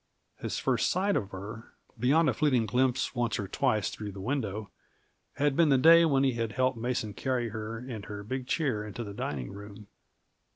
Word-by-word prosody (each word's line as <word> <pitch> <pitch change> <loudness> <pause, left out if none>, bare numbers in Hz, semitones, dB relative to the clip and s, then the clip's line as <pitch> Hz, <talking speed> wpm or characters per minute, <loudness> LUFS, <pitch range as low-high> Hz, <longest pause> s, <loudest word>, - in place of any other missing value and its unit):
His - - -4
first - - +1
sight 195 +2 +1
of 100 - -1
her 105 +4 -8 0.3
beyond 150 +6 +4
a 130 - +3
fleeting 125 -2 +2
glimpse 125 +3 +1
once 120 -3 0
or 100 - -3
twice 110 0 0
through 105 -2 -6
the 100 - -9
window 110 -3 -3 0.6
had 145 0 +1
been 165 -1 +4
that 135 -2 +3
day 165 +1 +8
when 135 -4 +3
he 135 -2 +3
had 115 -2 -2
helped 130 +2 +1
Mason 115 -3 -2
carry 125 +1 -1
her 110 +1 -5
and 115 -4 -7
her 105 -1 -7
big 130 +4 -4
chair 130 -10 0
into 105 +3 -6
the 100 -2 -7
dining 70 -10 -4
room. 100 +1 -10
120 Hz, 195 wpm, -29 LUFS, 105-135 Hz, 0.6 s, day